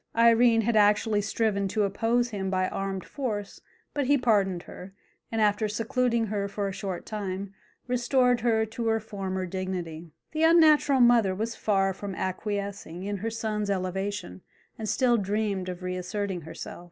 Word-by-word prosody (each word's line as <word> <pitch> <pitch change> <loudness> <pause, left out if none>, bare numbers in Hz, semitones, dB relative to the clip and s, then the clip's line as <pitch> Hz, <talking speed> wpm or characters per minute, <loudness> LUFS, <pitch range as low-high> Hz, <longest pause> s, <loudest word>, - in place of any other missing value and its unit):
Irene 230 0 +5
had 230 +1 0
actually 210 0 +4
striven 205 -1 0
to 210 +2 0
oppose 230 +5 +1
him 195 -2 -3
by 185 -1 +1
armed 195 -1 -4
force, 215 -8 -4 0.3
but 285 -3 -1
he 285 +1 +5
pardoned 200 -8 +1
her, 190 +2 -11 0.4
and 225 - -1
after 210 0 +2
secluding 230 +2 0
her 200 -1 -2
for 200 0 -3
a - - -3
short 195 -2 -5
time, 200 -2 -4 0.3
restored 250 0 +2
her 225 -1 +2
to 225 +1 -4
her 225 0 +2
former 195 -3 -4
dignity. 175 -3 -5 0.2
The 315 - -2
unnatural 310 -5 +5
mother 235 -6 +5
was 225 +3 -3
far 195 -2 +1
from 195 0 -6
acquiescing 200 -2 -4
in 205 +1 -3
her 220 +4 -3
son's 215 -2 -2
elevation, 190 - -3 0.3
and 220 -1 -5
still 240 +2 +3
dreamed 200 -2 -1
of 180 0 -6
reasserting 185 +1 -3
herself. 160 +1 -8
205 Hz, 160 wpm, -27 LUFS, 190-230 Hz, 0.4 s, Irene